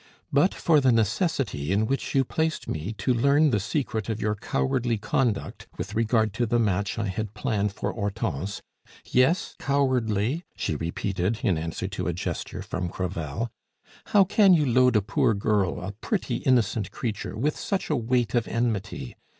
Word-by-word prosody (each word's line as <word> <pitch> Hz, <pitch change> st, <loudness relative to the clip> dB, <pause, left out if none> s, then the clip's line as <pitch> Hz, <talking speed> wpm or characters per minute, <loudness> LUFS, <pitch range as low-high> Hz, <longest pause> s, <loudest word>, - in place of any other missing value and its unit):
But 145 Hz, +7 st, +4 dB
for 155 Hz, -4 st, +3 dB
the 130 Hz, -2 st, +4 dB
necessity 115 Hz, -, 0 dB
in 105 Hz, +3 st, +2 dB
which 135 Hz, +4 st, -2 dB
you 135 Hz, -, +5 dB
placed 160 Hz, +4 st, -2 dB
me 80 Hz, +7 st, -3 dB
to 105 Hz, +5 st, 0 dB
learn 140 Hz, +5 st, +4 dB
the 105 Hz, -, +2 dB
secret 110 Hz, -1 st, -2 dB
of 110 Hz, -1 st, -2 dB
your 105 Hz, 0 st, 0 dB
cowardly 110 Hz, -, 0 dB
conduct 110 Hz, +1 st, -1 dB
with 100 Hz, -, -5 dB
regard 110 Hz, -1 st, +2 dB
to 120 Hz, +2 st, 0 dB
the 120 Hz, -, +2 dB
match 105 Hz, -2 st, 0 dB
I 115 Hz, -, -1 dB
had 105 Hz, +2 st, -4 dB
planned 105 Hz, -6 st, 0 dB
for 100 Hz, -, -3 dB
Hortense 100 Hz, -4 st, -3 dB, 0.4 s
yes, 130 Hz, +8 st, +2 dB
cowardly!" 130 Hz, -, +1 dB
she -, -, -2 dB
repeated, 95 Hz, +5 st, -2 dB
in 100 Hz, -8 st, +3 dB
answer 80 Hz, +4 st, -3 dB
to 95 Hz, -, -3 dB
a 90 Hz, -, 0 dB
gesture 85 Hz, -, -4 dB
from 90 Hz, 0 st, -3 dB
Crevel. 90 Hz, +4 st, -3 dB, 0.5 s
"How 205 Hz, -2 st, +5 dB
can 195 Hz, 0 st, +5 dB
you 150 Hz, -3 st, +2 dB
load 125 Hz, -1 st, +4 dB
a 105 Hz, -, +4 dB
poor 120 Hz, +1 st, +2 dB
girl, 100 Hz, -2 st, +1 dB
a 90 Hz, +3 st, -5 dB
pretty, 120 Hz, -, -2 dB
innocent 120 Hz, -5 st, +1 dB
creature, 110 Hz, -2 st, -4 dB
with 145 Hz, +6 st, 0 dB
such 195 Hz, -4 st, -2 dB
a -, -, +3 dB
weight 120 Hz, -2 st, 0 dB
of 120 Hz, -2 st, +1 dB
enmity? 110 Hz, -, -2 dB
110 Hz, 170 wpm, -26 LUFS, 100-130 Hz, 0.5 s, you